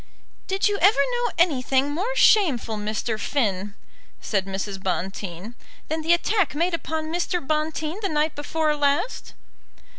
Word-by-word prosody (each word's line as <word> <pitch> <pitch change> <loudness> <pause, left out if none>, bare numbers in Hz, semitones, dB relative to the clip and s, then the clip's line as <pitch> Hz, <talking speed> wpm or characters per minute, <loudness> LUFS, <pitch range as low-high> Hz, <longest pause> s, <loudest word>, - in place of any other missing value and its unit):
"Did 385 +1 +1
you 410 -1 0
ever 400 +5 +5
know 485 -1 +1
anything 275 -4 +2
more 400 +12 -2
shameful, 305 - +4
Mr. 215 +1 -2
Finn," 205 -5 -1 0.4
said 195 -3 -1
Mrs. 195 0 -4
Bonteen, 190 +2 -4 0.4
"than 315 +1 -1
the 325 +2 +1
attack 345 -3 +1
made 340 +3 +1
upon 320 -1 -3
Mr. 355 +1 0
Bonteen 310 +3 -2
the 395 - -1
night 305 0 +1
before 305 +1 0
last?" 290 +10 -1
300 Hz, 140 wpm, -24 LUFS, 220-345 Hz, 0.4 s, ever